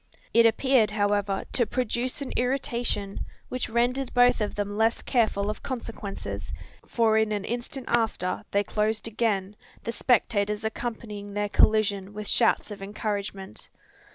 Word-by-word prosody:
It 230 0 +7
appeared, 230 -1 +3
however, 205 -1 0
to 240 -4 +1
produce 250 +2 -1
an 265 - -6
irritation, 245 -6 -1 0.3
which 255 -1 -3
rendered 245 +3 +1
both 245 -1 +5
of 210 - -1
them 205 0 -2
less 225 +2 +2
careful 220 -5 +1
of 215 +1 -3
consequences: 225 -6 -5 0.4
for 220 -2 +3
in 220 -1 +1
an 205 -2 -2
instant 245 +3 -3
after 220 -6 0
they 200 0 +2
closed 215 +2 0
again, 210 -3 -1 0.3
the 230 - -2
spectators 210 -4 +1
accompanying 215 -2 -5
their 205 0 0
collision 205 -2 +3
with 210 -1 -5
shouts 230 -1 +3
of 205 - -7
encouragement. 200 -1 -4
220 Hz, 140 wpm, -27 LUFS, 205-240 Hz, 0.4 s, It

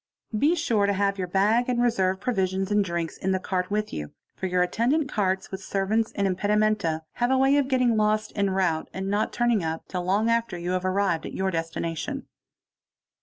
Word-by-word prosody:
Be 295 +10 +3
sur 230 -11 +1
to 200 - +2
have 200 0 0
your 180 - -2
bag 210 +7 +2
and 245 -1 +1
reserve 190 -6 +1
provisions 190 -4 -1
and 205 0 +3
drinks 170 -3 -3
in 190 0 -1
the 190 - 0
cart 180 -1 -2
witl 210 +1 -1
you, 75 -1 -5 0.2
for 190 - -3
your 180 0 +2
attendant 245 - +1
carts 190 -2 -1
with 190 0 -5
servants 210 +4 0
and 200 - 0
impedimenta 210 +3 +1
(saman, 160 0 -1 0.2
have 240 0 +1
a 265 - +3
way 270 +1 +4
of 280 -2 +2
getting 255 -3 +2
lost 215 0 +1
en 200 -1 +1
rowte 185 -4 0
and 190 +1 -3
not 205 +1 0
turning 240 -5 +1
up 160 0 -4
till 180 -1 -3
long 195 +4 +1
afte 230 -6 0
you 175 +1 -3
have 185 0 -1
arrived 185 -3 0
at - - -8
your 190 0 0
destination. 165 -1 -3
195 Hz, 210 wpm, -26 LUFS, 185-225 Hz, 0.2 s, way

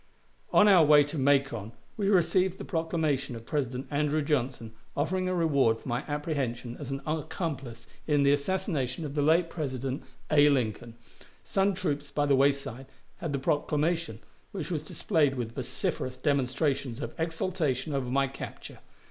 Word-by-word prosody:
On 210 - +6
our 185 -5 +7
way 150 -1 +7
to 145 +2 -5
Macon 135 -6 +1 0.2
we 200 -2 0
received 185 0 +3
the - - -7
proclamation 160 -6 -1
of 115 0 -9
President 130 -2 -2
Andrew 150 +1 +1
Johnson 125 -6 -1 0.2
offering 185 +5 0
a 185 - 0
reward 140 -9 +3
for - - -13
my 120 +2 -1
apprehension 140 -6 -3
as 145 -3 -6
an 135 0 -3
accomplice 145 - -4 0.2
in 145 -2 +3
the 140 - +5
assassination 150 - -1
of 140 - -5
the 145 - 0
late 165 +4 +4
President 135 -5 -4 0.3
A. 150 -1 +6
Lincoln. 120 -3 -1 0.5
Some 195 0 +1
troops 145 -3 -2
by 145 +1 0
the 140 -1 +4
wayside 135 -2 +1 0.3
had 165 - -4
the 140 - 0
proclamation, 150 +4 0 0.3
which 195 - -4
was 155 -4 -1
displayed 155 -2 +1
with 115 -3 -4
vociferous 130 +2 -3
demonstrations 135 -2 0
of 145 - -5
exultation 160 -4 -1
over 135 -3 -1
my 135 +2 +2
capture. 135 0 -8
145 Hz, 155 wpm, -29 LUFS, 130-160 Hz, 0.5 s, our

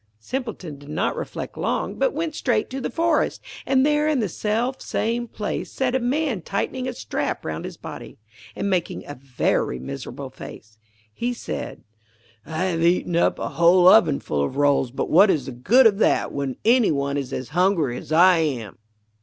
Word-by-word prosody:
Simpleton 205 - -5
did 145 0 -13
not 155 - -1
reflect - - -6
long, - - -2
but - - +1
went 325 -4 -3
straight 240 -7 0
to 265 +1 -4
the - - -2
forest, 330 +3 +1 0.3
and 265 0 +3
there 300 0 +2
in 305 -3 +2
the 215 - 0
self 230 +8 -2
same 235 +2 -2
place 210 -2 -4
sat 260 -2 -1
a 260 - +2
man 255 - -1
tightening 250 +8 -3
a - - -3
strap - - -3
round - - -4
his - - -8
body, - - -9 0.4
and 200 - -2
making 180 -3 -1
a 145 - -7
very 125 - -1
miserable 65 +2 -7
face. 110 0 -12 0.3
He 245 - -2
said: - - -6 0.6
'I 160 +2 -2
have 175 -3 -1
eaten 175 0 +2
up 170 - +2
a - - -3
whole 175 +2 +4
ovenful 150 - +4
of 130 - -3
rolls, 145 -3 +3
but 125 - -3
what 195 +5 +6
is 150 -8 +1
the - - -6
good 210 - +4
of 210 -2 +4
that - - +2
when 140 -2 -3
any 240 0 +5
one 140 -1 -1
is 140 -2 -3
as 130 -2 -5
hungry 170 -6 +1
as 140 - -9
I 175 +2 +6
am. 125 -10 -3
185 Hz, 185 wpm, -23 LUFS, -, 0.6 s, what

